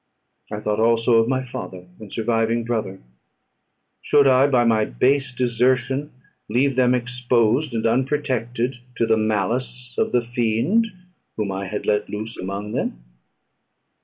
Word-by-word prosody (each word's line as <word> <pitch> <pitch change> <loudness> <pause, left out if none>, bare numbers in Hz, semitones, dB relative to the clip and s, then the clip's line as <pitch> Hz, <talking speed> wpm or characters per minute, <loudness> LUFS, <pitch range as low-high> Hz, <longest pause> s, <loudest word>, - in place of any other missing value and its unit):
I 105 - -3
thought 105 0 -1
also 115 +1 +3
of 115 0 +3
my 130 0 0
father, 90 -7 -7
and 105 -3 -11
surviving 115 0 0
brother: 110 -5 -3 1.0
should 145 -1 +4
I 135 +1 +5
by 125 -4 +3
my 110 -2 +3
base 135 +5 +1
desertion 125 +3 0 0.4
leave 130 +4 +2
them 125 -1 +3
exposed 125 +1 +1
and 110 - -1
unprotected 125 -1 0 0.2
to 115 - +1
the 110 0 +3
malice 115 +4 -2
of - - +1
the 120 -1 +2
fiend 120 - +1 0.5
whom 105 -3 -1
I 95 0 -4
had 105 +2 -4
let 105 0 0
loose 110 +2 -5
among 100 +3 -5
them? - - -3
120 Hz, 140 wpm, -22 LUFS, 110-130 Hz, 1.0 s, I